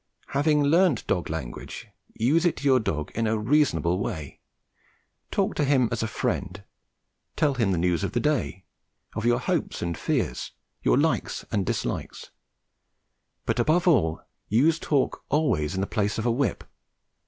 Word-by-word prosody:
Having 150 +1 +2
learnt 160 - +3
dog 90 - -1
language, 75 -7 -6 0.3
use 145 +9 +2
it 175 - +2
to - - -8
your 135 -2 +5
dog 75 -9 -3
in 115 0 0
a 110 0 +1
reasonable 105 - +2
way: 80 -7 -5 0.9
talk - - 0
to - - 0
him 135 -4 +3
as - - -1
a 115 - 0
friend, 100 -2 -3 0.7
tell 145 -2 +2
him 115 -6 +1
the 90 - +1
news 85 -1 +1
of - - -2
the 120 - +1
day, 120 -9 -1 0.5
of 105 - -3
your 120 0 +4
hopes - - -1
and 85 -1 -2
fears, 60 - -2 0.3
your - - +3
likes - - 0
and 100 -3 0
dislikes, - - -3 1.1
but - - 0
above 175 +4 +2
all 80 - +3 0.3
use 155 +10 +3
talk 140 -4 0
always 115 - +1
in 95 - -1
the - - +1
place 105 -1 -1
of 110 - -2
a 120 - +3
whip. 125 +2 0
115 Hz, 165 wpm, -26 LUFS, 90-145 Hz, 1.1 s, your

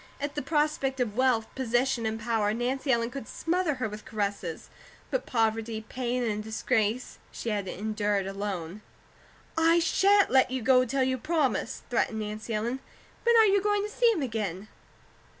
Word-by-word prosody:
At 285 0 -3
the 295 - -2
prospect 285 -2 0
of 225 -5 -1
wealth, 250 -3 +3
position, 245 -2 0
and 220 0 -3
power, 215 -2 0
Nancy 260 +3 -1
Ellen 235 -1 +1
could 270 -4 -7
smother 340 -2 -1
her 255 -4 -2
with 210 0 -8
caresses; 200 -6 -3 0.4
but - - -1
poverty, 225 -2 0
pain, 250 0 -1
and 215 -2 -1
disgrace 220 +1 -1
she 235 - -5
had 205 -3 -2
endured 210 0 -1
alone. 195 -2 -4 0.7
"I 330 +1 +4
shan't 395 +4 +4
let 260 0 +5
you 260 -2 -3
go 255 +1 +5
till 265 +2 0
you 260 0 0
promise," 290 - 0
threatened 225 -2 0
Nancy 215 +2 -5
Ellen. 230 +4 -1 0.5
"When 470 0 +5
are 445 - +8
you 400 -1 +4
to 415 0 +1
see 480 -1 +5
him 330 -10 -1
again?" 215 -5 -3
240 Hz, 165 wpm, -28 LUFS, 215-275 Hz, 0.7 s, are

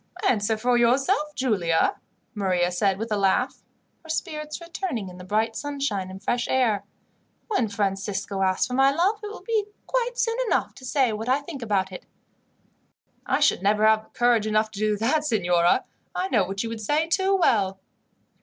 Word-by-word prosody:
"Answer 220 - +1
for 245 +2 +2
yourself, 275 +6 +2
Giulia," 190 -11 +1 0.4
Maria 185 -4 +1
said 190 +1 +1
with 225 +2 -5
a - - +2
laugh, 195 -1 +1 0.4
her 320 - -16
spirits 305 -2 -3
returning 335 - -4
in 180 0 -12
the - - -9
bright 220 +4 0
sunshine 275 -10 -3
and 190 +1 -10
fresh 240 +3 0
air. 220 -6 +1 0.6
"When 325 - +1
Francisco 200 -1 -2
asks 185 -1 +2
for 250 - -6
my 270 +1 +5
love, 365 +9 +1
it - - -4
will 420 - -9
be 445 -3 0 0.2
quite - - -1
soon 460 0 0
enough - - 0
to 260 - -12
say 255 -3 +2
what 220 +3 -4
I 270 +3 +3
think 285 -3 -8
about 200 -4 0
it." 180 - -9 1.2
"I - - +2
should - - +3
never 210 +2 +3
have 220 0 +3
courage 240 -3 +2
enough 215 0 +1
to 205 - -8
do 215 -1 +1
that, 275 +8 +1
signora. 180 - +2 0.3
I 370 +1 -1
know 210 - +3
what 195 +2 -3
you 230 - -4
would 225 -1 -6
say 300 +9 +1
too 385 +3 +2
well." 200 - +2
225 Hz, 180 wpm, -25 LUFS, 200-295 Hz, 1.2 s, my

